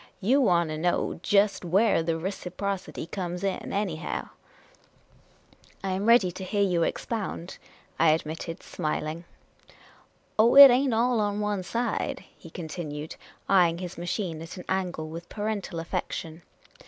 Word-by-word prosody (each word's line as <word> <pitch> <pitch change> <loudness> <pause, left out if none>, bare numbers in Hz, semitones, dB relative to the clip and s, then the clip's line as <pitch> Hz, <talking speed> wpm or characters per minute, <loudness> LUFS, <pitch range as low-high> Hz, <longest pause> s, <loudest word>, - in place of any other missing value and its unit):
" - - -38
You 275 +3 +5
want 170 -8 +3
to 155 - -4
know 175 0 0
jest 200 0 +2
where 195 +2 +3
the 165 0 -1
reciprocity 190 +2 -4
comes 180 0 -5
in, 195 -1 -2
anyhow? 190 -5 -3 0.5
" - - -33
" - - -30
I 195 - -1
am 195 +3 -1
ready 230 -6 +5
to 185 +2 -8
hear 200 +2 0
you 180 -3 +1
expound," 190 -1 -3 0.4
I 165 - +5
admitted, 160 +2 -2
smil 155 -2 -3
ing. 165 +3 -6 1.1
Oh, 230 +4 +5
it 280 -1 +12
ain't 255 -1 +2
all 240 +1 +2
on 205 -1 0
one 210 -2 -1
side," 230 +5 -2
he 165 - -13
continued, 155 -2 -6 0.3
eying 175 -4 +4
his 180 -1 -6
machine 175 -1 -3
at 165 +3 -9
an 180 - -9
angle 180 -4 -2
with 165 +2 -8
parental 205 -5 -3
affection. 165 0 -4
180 Hz, 155 wpm, -27 LUFS, 165-205 Hz, 1.1 s, it